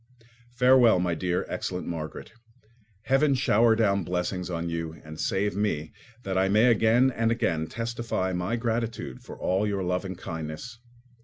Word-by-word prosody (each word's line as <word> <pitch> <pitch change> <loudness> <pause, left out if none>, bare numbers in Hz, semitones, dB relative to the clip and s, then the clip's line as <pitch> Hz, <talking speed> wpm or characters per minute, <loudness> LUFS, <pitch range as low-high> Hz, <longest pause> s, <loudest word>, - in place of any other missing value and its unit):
Farewell, 125 -3 +6
my 90 -1 0
dear, 90 +1 -1
excellent 90 0 -4
Margaret. 80 +2 -6 0.7
Heaven 135 +2 +3
shower 115 -2 +4
down 100 -4 +2
blessings 90 +1 -2
on 85 -1 -3
you, 85 -1 -4
and 80 0 -10
save 100 0 0
me, 80 -7 -1 0.3
that 95 -1 -1
I 95 0 +2
may 110 +5 +5
again 115 +4 +4
and 115 -2 0
again 80 -9 0
testify 115 -4 -3
my 90 +5 -1
gratitude 115 - -3
for - - -10
all 95 +3 0
your 100 -2 -1
love 90 +1 -1
and 95 -2 -6
kindness. 80 +8 -6
95 Hz, 155 wpm, -27 LUFS, 90-115 Hz, 0.7 s, Farewell